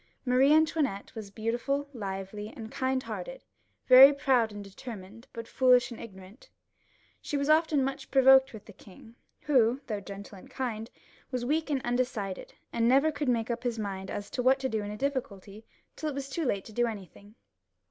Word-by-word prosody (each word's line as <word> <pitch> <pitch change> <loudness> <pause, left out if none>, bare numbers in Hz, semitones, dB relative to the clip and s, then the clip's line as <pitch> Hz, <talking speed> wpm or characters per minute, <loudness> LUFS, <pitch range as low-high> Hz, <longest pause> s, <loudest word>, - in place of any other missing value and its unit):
Marie 255 +3 +4
Antoinette 310 -9 +1
was 220 -4 -8
beautiful, 240 +7 -2
lively, 200 -1 -6
and 220 -1 -8
kind 260 0 -1
hearted, - - -7 0.4
very 265 +2 +10
proud 260 -5 +1
and 205 0 -8
determined, 205 +2 -10
but 230 -1 -8
foolish 250 -1 +3
and 235 - -8
ignorant. 195 +1 -13 0.7
She 290 - -3
was 280 +2 +1
often 310 -3 +3
much 270 0 -4
provoked 265 0 +6
with 220 -3 -11
the 210 - -13
king, 205 +4 -16 0.3
who, 250 -6 +3
though 210 -3 -4
kind 200 - -13
and 200 0 -7 0.3
gentle, 230 -4 -3 0.4
was 250 -2 -3
weak 310 +4 0
and 275 -3 -1
undecided, 240 -6 -3 0.2
and 230 0 +1
never 275 +5 +4
could 290 -2 -2
make 235 -1 0
up 235 0 -3
his 240 -2 -2
mind 195 -3 -5
as 205 - -6
to 250 - -2
what 260 +2 +4
to 265 - -1
do 220 -2 -1
in 205 - -5
a 210 - -6
difficulty, 220 -6 -4 0.3
tiU 310 - -3
it 290 - -6
was 275 0 -5
too 325 +3 -2
late 200 -6 -1
to 220 - -12
do 240 +2 +1
anything. 205 0 -9
240 Hz, 190 wpm, -29 LUFS, 210-270 Hz, 0.7 s, very